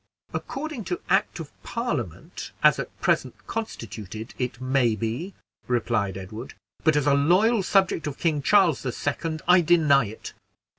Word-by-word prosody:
"According 295 -4 -4
to 360 - -2
act - - +2
of - - -7
Parliament, - - -4
as - - +6
now - - -1 0.2
present - - +1
constituted, 110 - -6
it 125 -1 -2
may 130 -3 +2
be," 115 - -4 0.3
replied 115 -5 0
Edward, 110 +6 -8 0.3
"but 160 -2 +4
as 150 -1 +2
a 145 - +4
loyal 185 +11 +4
subject 190 -5 +2
of 140 - -5
King 155 -4 0
Charles 180 -1 +4
the 130 - -2
Second, 155 +5 -3
I 180 0 +7
deny 155 -6 +4
it." 110 +2 -8
140 Hz, 150 wpm, -25 LUFS, 115-180 Hz, 0.3 s, I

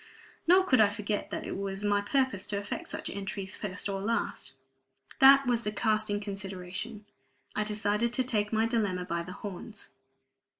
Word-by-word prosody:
Nor 370 +2 +7
could 255 -11 +4
I 210 - +6
forget 205 0 -3
that - - -4
it - - -4
was 195 0 -4
my 205 0 +2
purpose 260 -2 0
to 200 - 0
effect 200 0 -4
such - - -4
entry 195 0 -4
first 190 0 -3
or 195 -1 -2
last. 205 -10 -2 0.7
That 275 +1 +8
was 240 -2 +2
the 210 - -2
casting 215 -1 +1
consideration. 200 +1 -5 0.5
I 210 - +1
decided 210 +2 0
to 255 - +2
take 210 -4 0
my 220 0 +2
dilemma 205 -6 0
by 170 -1 -2
the 180 +2 -7
horns. 205 +2 -7
205 Hz, 170 wpm, -30 LUFS, 195-225 Hz, 0.7 s, That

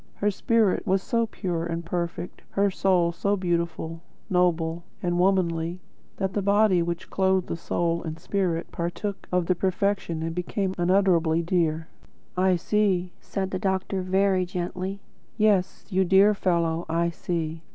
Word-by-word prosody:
Her 205 +1 +1
spirit 220 0 +1
was 190 0 +2
so 230 -3 +1
pure 175 -6 -3
and 170 0 -4
perfect, 170 0 -4
her 200 0 +1
soul 180 -3 +2
so 200 +4 0
beautiful, 170 -2 -2 0.3
noble, 170 -2 +1 0.2
and 175 0 0
womanly, 175 -2 +1 0.4
that 190 -1 -1
the 205 - 0
body 200 -2 +4
which 170 0 -4
clothed 190 -2 +1
soul 170 0 0
and 160 -1 -5
spirit 180 -2 -1
partook 175 +4 -4
of 180 -1 +2
their 185 - +3
perfection 185 -2 -1
and 165 0 -2
became 185 +2 -2
unutterably 175 -3 +3
dear." 165 -2 0 0.5
"I 185 0 +3
see," 185 -1 +1
said 190 -1 -4
the 185 - -2
doctor, 190 0 -1
very 190 0 +2
gently. 185 +2 -4 0.4
"Yes, 210 -4 +2
you 190 0 +3
dear 195 +3 +5
fellow, 170 -3 0
I 170 +1 +1
see." 165 -2 -3
180 Hz, 145 wpm, -26 LUFS, 170-195 Hz, 0.5 s, dear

